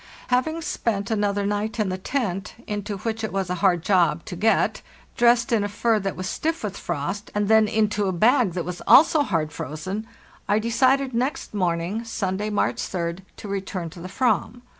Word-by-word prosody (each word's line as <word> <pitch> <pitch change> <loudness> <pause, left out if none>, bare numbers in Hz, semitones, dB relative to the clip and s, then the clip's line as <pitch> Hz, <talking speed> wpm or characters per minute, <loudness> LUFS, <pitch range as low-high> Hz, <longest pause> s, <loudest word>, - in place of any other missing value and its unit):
Having 315 +7 +1
spent 205 -7 -2
another 205 -2 0
night 205 +2 -2
in 210 -3 +1
the 185 - -2
tent 200 -4 -2
—into 205 -1 -4
which 225 +2 -3
it 220 - -2
was 190 -2 -2
a 180 -2 -3
hard 175 -4 +3
job 170 -5 +2
to 180 - -6
get, 220 +5 +2 0.3
dressed 240 +1 +4
in 225 -3 +3
a 205 - -2
fur 220 +2 +1
that 195 -1 -3
was 185 0 -4
stiff 325 +8 -2
with 200 -2 -3
frost, 175 +5 -4
and 205 0 +1
then 220 0 +5
into 210 -2 +1
a - - +1
bag 220 +2 +3
that 175 -1 -3
was 180 0 -5
also 310 +1 +7
hard 165 - -1
frozen—I 200 - -5
decided 255 +4 +2
next 255 +3 -2
morning 180 +2 -1
(Sunday, 205 -2 -2
March 210 - 0
3d) 170 -1 -3 0.2
to - - -8
return 190 -4 -4
to 175 - -11
the 175 - -7
Avam. 245 +1 0
205 Hz, 185 wpm, -24 LUFS, 185-230 Hz, 0.3 s, also